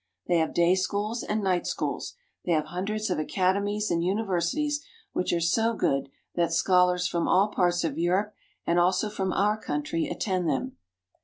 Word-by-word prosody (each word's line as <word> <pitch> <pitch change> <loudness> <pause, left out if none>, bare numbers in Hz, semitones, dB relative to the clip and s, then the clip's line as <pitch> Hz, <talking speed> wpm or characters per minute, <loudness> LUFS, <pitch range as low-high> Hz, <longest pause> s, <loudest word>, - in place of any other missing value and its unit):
They 175 - +3
have 160 - 0
day 170 +1 +4
schools 205 +5 -1
and 210 0 -2
night 185 -2 +1
schools; - - -3 0.3
they 175 - +1
have 155 -1 +1
hundreds 210 +3 -2
of 180 - 0
academies 200 +5 0
and 170 0 +1
universities, 205 - 0 0.3
which 180 - 0
are 170 - +1
so 225 +8 +2
good 135 -8 0 0.2
that 170 -1 +1
scholars 180 -1 +3
from 170 -1 -1
all 200 +3 +4
parts 175 -3 +1
of 160 -2 -2
Europe 190 +5 +1 0.3
and 170 +1 +2
also 185 +4 +2
from 190 -3 -2
our 210 +3 +2
country 150 +3 -2
attend 185 -5 -1
them. 260 +9 -2
185 Hz, 170 wpm, -27 LUFS, 170-210 Hz, 0.3 s, day